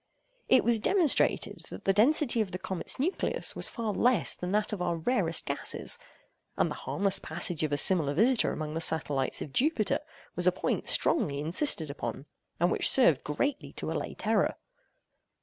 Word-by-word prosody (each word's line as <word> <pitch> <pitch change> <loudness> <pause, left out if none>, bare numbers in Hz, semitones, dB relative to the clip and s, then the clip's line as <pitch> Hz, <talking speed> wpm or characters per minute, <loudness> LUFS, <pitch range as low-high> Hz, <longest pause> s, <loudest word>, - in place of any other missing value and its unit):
It - - +5
was 235 -2 +3
demonstrated, 340 - +1
that - - -10
the 195 - +3
density 235 +2 +3
of 210 - -2
the 180 - -4
comet's 185 -1 -3
nucleus 330 +9 -1
was - - -1
far 225 -4 -4
less 240 -2 +1
than 180 0 -5
that 210 +1 0
of 195 - -4
our 175 -1 -1
rarest 245 +11 -1
gas; 475 - -2 0.6
and - - +1
the - - -8
harmless 195 -1 +2
passage 170 0 0
of 155 -2 -1
a 145 - 0
similar 145 -2 +5
visitor 235 - +3
among 155 -1 -5
the 165 - -3
satellites 145 -4 0
of 140 - -11
Jupiter 275 - +1 0.4
was 180 0 +3
a - - +6
point 180 - -3
strongly 145 - +1
insisted 160 - -2
upon, 135 -1 -6 0.3
and 175 +2 +2
which - - +1
served 170 - +3
greatly 275 - -3
to - - -5
allay - - -4
terror. - - 0
190 Hz, 175 wpm, -28 LUFS, 155-245 Hz, 0.6 s, a